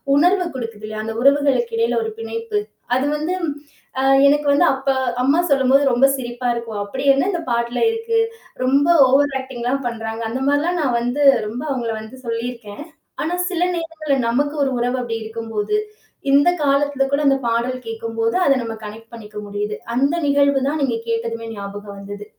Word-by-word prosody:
உணர்வு 360 +5 +3
கொடுக்குது 230 -4 -6
இல்லயா! 215 0 -5
அந்த 225 0 -4
உறவுகளுக்கு 285 - +3
இடையில 460 0 +1
ஒரு 445 - -3
பிணைப்பு. 455 -1 -3 0.4
அது 260 - +1
வந்து 315 +5 -2 0.7
அ - - 0 0.2
எனக்கு 295 +1 +2
வந்து, 290 - +4
அப்ப 270 +1 -3 0.3
அம்மா 280 +6 +3
சொல்லும்போது 270 0 +4
ரொம்ப 255 +3 +5
சிரிப்பா 240 0 -4
இருக்கும். 230 -3 -5
அப்பிடி 265 +7 -5
என்ன 275 +7 +1
இந்த 345 - -2
பாட்டுல 235 +1 -1
இருக்கு. 455 0 0 0.4
ரொம்ப 275 +3 +3 0.2
ஓவர் 280 +2 +3
ஆக்டிங் 260 -2 -8
எல்லாம் 270 +3 -1
பண்றாங்க. 225 -1 -4
அந்த 255 +4 -3
மாதிரி 285 0 +3
எல்லாம் 350 +1 0
நான் 255 -4 +1
வந்து 245 +5 0 0.2
ரொம்ப 230 +4 -5
அவுங்கள 235 -4 -2
வந்து 220 +4 -11
சொல்லியிருக்கேன். 230 0 -5 0.4
ஆனா 325 +3 -2 0.2
சில 350 -2 -2 0.2
நேரங்கள்ல 315 -4 -2
நமக்கு 285 +5 0
ஒரு 270 - 0
உறவு 245 +2 0
அப்பிடி 230 -2 -4
இருக்கும்போது, 225 - -2 0.5
இந்த 285 +5 +5
காலத்தில 280 0 +2
கூட 280 - +2
அந்த 275 - +4
பாடல் 245 +2 -1
கேட்கும்போது, 225 0 -2
அத 275 - +5
நம்ம 225 -1 -5
கனெக்ட் 225 +2 -10
பண்ணிக்க 210 -2 -10
முடியுது. 205 +1 -3 0.2
அந்த 275 +6 +2
நிகழ்வு 280 -1 +3
தான் 305 0 -2
நீங்க 240 -4 0
கேட்டதுமே 230 0 -2
ஞாபகம் 200 0 -8
வந்தது. 205 +1 -8
255 Hz, 170 wpm, -20 LUFS, 230-285 Hz, 0.7 s, ரொம்ப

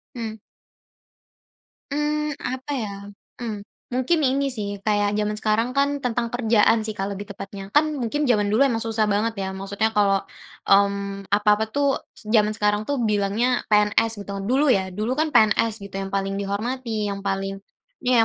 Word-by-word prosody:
Mmm. 220 -2 -5 1.5
Mmm, 300 0 -1
apa 260 +3 -4
ya? 225 -7 -2 0.5
Mmm, 215 -3 -4 0.3
mungkin 260 +7 +1
ini 275 +1 +2
sih 205 -6 -1
kayak 205 0 +1
jaman 210 0 -1
sekarang 215 +2 +1
kan 280 +1 +2
tentang 240 -2 -1
kerjaan 230 -2 +3
sih 215 - -4
Kak 195 +1 -3
lebih 200 +1 -6
tepatnya. 195 0 -8
Kan 300 -1 +3
mungkin 270 +6 -1
jaman 215 -6 +2
dulu 215 +6 +4
emang 245 -5 +1
susah 225 -1 0
banget 220 +3 +1
ya - - -2
maksudnya 200 +3 -1
kalau, 200 -2 +2 0.4
mmm, 200 0 +2
apa-apa 210 +1 +3
tuh 280 -1 +2 0.2
zaman 215 -1 +1
sekarang 210 0 0
tuh 285 - 0
bilangnya 215 +4 +1
PNS 210 0 +2
gitu - - -16
kan, - - -5
dulu 270 +3 +3
ya 190 -3 +2
dulu 215 +4 -1
kan 315 - +2
PNS 215 -1 +3
gitu 200 -1 -9
yang 195 - -3
paling 195 0 -1
dihormati 215 +1 -2
yang 200 - -4
paling 195 0 -2 0.4
iya 250 -1 +3
215 Hz, 165 wpm, -23 LUFS, 200-250 Hz, 1.5 s, dulu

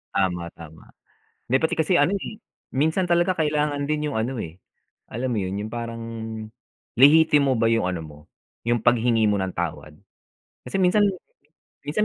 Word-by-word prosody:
Tama, 90 -3 0
tama. 80 -1 -13 0.6
May 130 - +4
pati 160 +3 0
kasi 165 +3 +2
ano, 195 - +3
eh, 200 +2 -5 0.3
minsan 160 +6 0
talaga 175 +2 +3
kailangan 150 -2 0
din 150 0 0
yung - - -5
ano, 125 +3 -3
eh, 85 -2 -7 0.5
alam 125 +2 -2
mo - - 0
yun, 95 +1 -3
yung 110 - -10
parang 115 -1 -5 0.9
lihitimo 145 -1 +5
ba 115 - +2
yung 115 -5 +2
ano 90 -2 -4
mo, 75 -1 -13 0.4
yung 120 +1 +1
paghingi 115 -1 +3
mo 105 - +2
ng 95 - -2
tawad. 80 -3 -4 0.7
Kasi 195 - -3
minsan 190 +3 +4 0.8
minsan 155 +9 0
120 Hz, 160 wpm, -24 LUFS, 105-155 Hz, 0.9 s, lihitimo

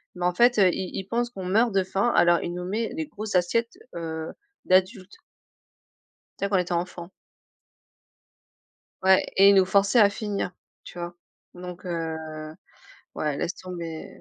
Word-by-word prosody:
mais 180 0 -3
en 180 - +2
fait, 240 +5 +4
heu, 190 -2 +6
il 185 +1 -4
il 190 - -4
pense 240 +2 -1
qu'on 190 -5 -7
meurt 220 +6 +3
de 195 -1 +3
faim 195 +5 0
alors 175 0 +5
il 175 - -4
nous 180 0 -5
met 220 +5 -2
les 315 -1 -3
grosses 215 -8 -6
assiettes, 230 +7 +1 0.2
heu, 160 -1 -5 0.3
d'adultes. 185 - +1 1.2
Tu - - 0
sais 200 - -2
quand 200 - +1
on - - +4
était 180 - -7
enfant. 175 0 -3 1.9
Ouais 190 0 +5
et 195 +1 +8
il 200 - +6
nous 190 - +6
forçait 200 +4 +3
à 205 - +7
finir, 200 -3 -3 0.3
tu 175 - -10
vois? 175 0 -6 0.4
Donc 180 0 -9
heu, 165 -2 -3 1.0
ouais, 150 -2 -1
laisse 175 - -2
tomber, 170 -3 -7
185 Hz, 170 wpm, -25 LUFS, 175-200 Hz, 1.9 s, et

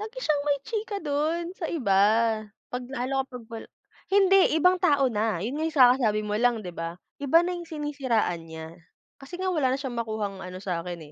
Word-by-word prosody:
Lagi 440 +4 -7
siyang 295 -2 +1
may 285 -1 +2
chika 440 -2 -3
dun 315 +4 -1
sa 345 -4 -4
iba, 200 - +2 0.7
'pag 250 0 -3
lalo 270 +1 -1
kapag 250 -3 -9
wala 225 - -7 0.4
hindi, 390 -4 +5
ibang 360 +4 +5
tao 285 -6 +4
na. 220 -4 0
Yun 245 +5 -3
nga - - 0
yung 315 - -16
sa 250 -3 +8
kasasabi 220 -5 +1
mo 210 - -2
lang, 235 -1 +1
'di 180 - -6
ba? 165 +1 -5 0.2
Iba 325 +5 +4
na 360 +1 -2
yung 345 -2 -7
sinisiraan 270 - -1
niya. 160 0 -8 0.5
Kasi 280 +6 -9
nga 375 0 -1
wala 285 -6 +2
na 265 - 0
siyang 265 -3 -5
makuhang 215 -4 -3
ano 185 0 -7
sa 185 -3 -3
akin, 175 0 -6
265 Hz, 205 wpm, -26 LUFS, 215-325 Hz, 0.7 s, sa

